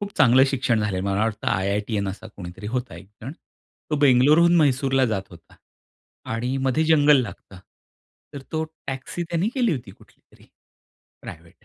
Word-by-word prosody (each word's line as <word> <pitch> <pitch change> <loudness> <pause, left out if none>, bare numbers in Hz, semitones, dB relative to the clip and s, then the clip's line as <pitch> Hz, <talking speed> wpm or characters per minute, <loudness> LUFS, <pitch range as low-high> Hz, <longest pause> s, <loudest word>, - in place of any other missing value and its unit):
खूप 205 0 -6
चांगलं 130 +1 +6
शिक्षण 125 -4 0
झालेलं, 95 -3 -2
मला 100 +1 0
वाटतं 110 -2 -2
आयआयटीअन 100 +2 -1
असा 100 +3 -8
कोणीतरी 90 +2 -9
होता. 125 -4 -4
एकजण 105 - -11 0.6
तो 150 - +1
बेंगलोरहून 150 +6 +5
म्हैसूरला 135 -3 +2
जात 105 -4 -2
होता 85 -2 -17 0.8
आणि 125 +4 -2
मध्ये 155 +5 +1
जंगल 150 -3 +5
लागतं. 100 -5 -10 0.8
तर 140 - -7
तो 160 0 -1 0.3
टॅक्सी 135 +6 -5
त्यांनी 170 +4 0
केली 245 -6 +1
होती, 120 -9 -6
कुठलीतरी - - -22 0.8
प्रायव्हेट. 85 +1 -12
125 Hz, 145 wpm, -23 LUFS, 100-145 Hz, 0.8 s, चांगलं